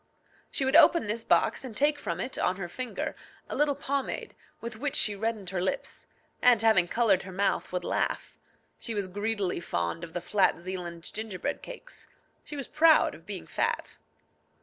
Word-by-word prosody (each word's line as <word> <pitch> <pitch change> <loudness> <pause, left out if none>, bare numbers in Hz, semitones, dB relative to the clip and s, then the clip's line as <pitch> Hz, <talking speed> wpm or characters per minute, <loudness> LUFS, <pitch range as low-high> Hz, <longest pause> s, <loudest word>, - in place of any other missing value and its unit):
she 270 - -1
would 265 +3 +2
open 335 -3 +7
this 220 +2 -2
box, - - +2
and 235 -5 -7
take 295 +1 +2
from - - -3
it, 260 - -3
on 180 - +1
her 185 -2 -5
finger, 250 +7 -4 0.3
a - - -4
little 290 -1 +2
pomade, 280 -1 -3 0.3
with 235 -1 -6
which 290 +4 -1
she 210 -7 +4
reddened 210 -3 -2
her 185 -2 -1
lips, 185 - -3 0.3
and, 240 -3 +5
having 215 -6 +5
coloured 210 -3 +3
her 190 - -9
mouth, 195 +2 0
would 180 -1 -2
laugh. - - -1 0.4
She 230 - -4
was 200 -2 -1
greedily 205 -1 -1
fond 85 - -2
of 165 -1 -8
the 175 - -1
flat 190 +2 +2
Zealand 175 -2 -5
gingerbread 215 -4 -3
cakes. - - -8 0.4
She 295 - -8
was 275 -2 -4
proud 315 +1 +5
of - - -14
being - - -5
fat. - - -2
215 Hz, 180 wpm, -29 LUFS, 185-265 Hz, 0.4 s, open